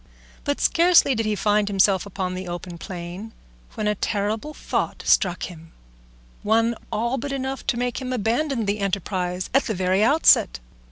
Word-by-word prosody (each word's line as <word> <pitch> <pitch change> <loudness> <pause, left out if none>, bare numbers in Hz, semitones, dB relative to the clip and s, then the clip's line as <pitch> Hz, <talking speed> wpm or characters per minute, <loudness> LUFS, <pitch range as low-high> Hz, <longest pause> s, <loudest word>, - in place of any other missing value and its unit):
But 285 0 -1
scarcely 340 -4 +4
did 225 -2 -1
he 215 - 0
find 210 0 +1
himself 195 -1 +2
upon 185 -2 -3
the 185 0 -6
open 175 0 -7
plain, 180 +5 -7 0.4
when 215 - -2
a 210 - +2
terrible 210 +6 -2
thought - - -3
struck 180 -3 +2
him, 165 -2 -9 0.7
one 225 +2 +2 0.2
all 235 +4 -1
but 285 - -4
enough 270 0 -4
to 260 -3 +1
make 245 0 -2
him 255 -1 -4
abandon 245 +2 0
the 205 +1 -1
enterprise 185 -2 -2
at 270 - +3
the 220 - -2
very 185 +2 +1
outset. 230 - +4
210 Hz, 165 wpm, -23 LUFS, 185-245 Hz, 0.7 s, scarcely